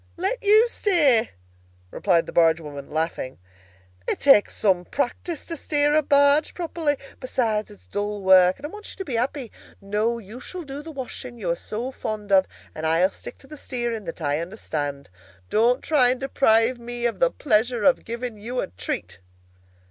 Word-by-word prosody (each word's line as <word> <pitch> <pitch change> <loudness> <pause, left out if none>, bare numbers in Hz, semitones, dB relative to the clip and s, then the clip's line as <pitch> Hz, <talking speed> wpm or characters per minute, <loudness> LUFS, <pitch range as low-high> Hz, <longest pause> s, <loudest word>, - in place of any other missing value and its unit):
"Let 390 +8 -1
you 430 +3 +6
steer?" 305 - +3 0.6
replied 175 -4 +2
the - - -8
barge 165 -1 +4
woman, 145 -3 -9
laughing. 155 -5 -3 0.7
"It - - -1
takes 275 -7 +5
some 185 -4 +2
practice 285 - -3
to 335 - -5
steer 295 -1 +1
a 310 - +5
barge 285 +1 +3
properly. 325 -4 -1 0.2
Besides, 225 -5 -1
it's 90 -3 -16
dull 205 - -3
work, 185 -1 +6
and 280 - -9
I - - -4
want 420 +4 -10
you - - -11
to 385 - -5
be 270 - -5
happy. 250 +1 -2 0.3
No, 210 +4 -1
you 225 +2 -10
shall 360 +6 -5
do 280 -1 -7
the 320 - -10
washing 255 -3 -6
you 185 -7 -2
are - - +1
so 230 +8 -5
fond 210 -5 -5
of, 190 -1 +5 0.3
and 160 0 -3
I'll 170 +4 +3
stick - - -11
to 270 - -19
the 305 - -10
steering 240 -6 -4
that 165 0 -7
I 145 +1 0
understand. 145 - -5 0.4
Don't 240 +4 +3
try 275 -6 +4
and 250 0 0
deprive 240 -3 +2
me 240 0 -5
of 235 - -1
the - - +4
pleasure 240 - +1
of 275 - +4
giving 235 -1 -5
you 245 +4 -4
a - - -2
treat!" 90 0 -5
235 Hz, 185 wpm, -24 LUFS, 190-280 Hz, 0.7 s, you